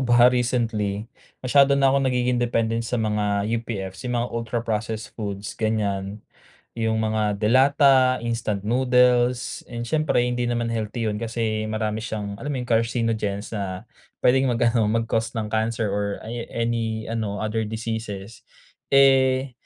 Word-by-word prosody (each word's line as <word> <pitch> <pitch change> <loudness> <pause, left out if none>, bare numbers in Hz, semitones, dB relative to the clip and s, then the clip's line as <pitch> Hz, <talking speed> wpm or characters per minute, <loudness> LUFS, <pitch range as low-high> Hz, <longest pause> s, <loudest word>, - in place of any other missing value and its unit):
ba, 120 -1 +5
recently 115 -5 0 0.4
masyado 140 +2 +5
na 135 -1 +4
akong 135 -1 +2
nagiging 125 -1 +1
dependent 115 -1 0
sa 125 - -1
mga 105 -2 0 0.2
UPF's, 95 -5 -6
yung 120 - -1
mga 120 +1 -1
ultra 115 0 -2
processed 110 0 -3
foods 100 -2 -5
ganyan, 105 -2 -1 0.5
yung 110 -1 -1
mga 110 -1 0
delata, 130 +3 +4
instant 110 -4 -2
noodles 125 0 +2
and 120 -1 -5
siyempre 155 -1 +1
hindi 125 0 -1
naman 120 -1 -1
healthy 115 +1 -3
'yun 105 0 -3
kasi 110 -2 -2
marami 110 0 -2
siyang, 105 -3 -5
alam 145 - -5
mo 145 - -2
yung, 120 - -14
carcinogens 115 -3 0
na 100 -1 -4 0.4
puwedeng 130 +1 +4
mag-ano, 115 -2 +2
mag-cause 115 +1 -1
ng 110 -1 -3
cancer 110 -1 0
or 100 0 -1
aya 115 +1 -6
any 115 -1 -2
ano 110 -3 -3
other 110 +1 -2
diseases. 110 -2 -5 0.5
Eh, 135 -1 +4
115 Hz, 145 wpm, -23 LUFS, 110-120 Hz, 0.5 s, ba